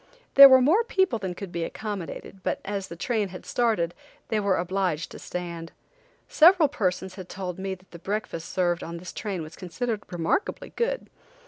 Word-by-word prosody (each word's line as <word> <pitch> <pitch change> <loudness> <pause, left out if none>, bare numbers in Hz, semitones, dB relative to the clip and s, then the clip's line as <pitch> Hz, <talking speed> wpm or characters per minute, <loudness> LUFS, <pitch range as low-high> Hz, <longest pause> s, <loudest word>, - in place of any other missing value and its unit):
There 275 0 +12
were 260 -1 +7
more 335 - +4
people 380 - +1
than 185 -3 -4
could 195 -1 -7
be 170 -1 -2
accommodated, 195 0 -6
but - - -1
as 200 -1 -3
the 170 - -8
train 215 +3 -1
had 185 -1 -10
started, 215 -8 +1 0.4
they 220 - +1
were 200 -2 +2
obliged 180 -3 -1
to - - -9
stand. 170 -2 -6 0.5
Several 335 0 +6
persons 190 -6 -2
had 185 -2 -9
told 185 -2 -5
me 190 0 -3
that 185 +1 -24
the 170 - -10
breakfast 195 -4 -4
served 175 -2 0
on 170 +1 -6
this 175 +1 -9
train 195 -6 -4
was 155 - -10
considered 215 +4 -3
remarkably 175 - -1
good. - - -1
190 Hz, 185 wpm, -26 LUFS, 175-225 Hz, 0.5 s, There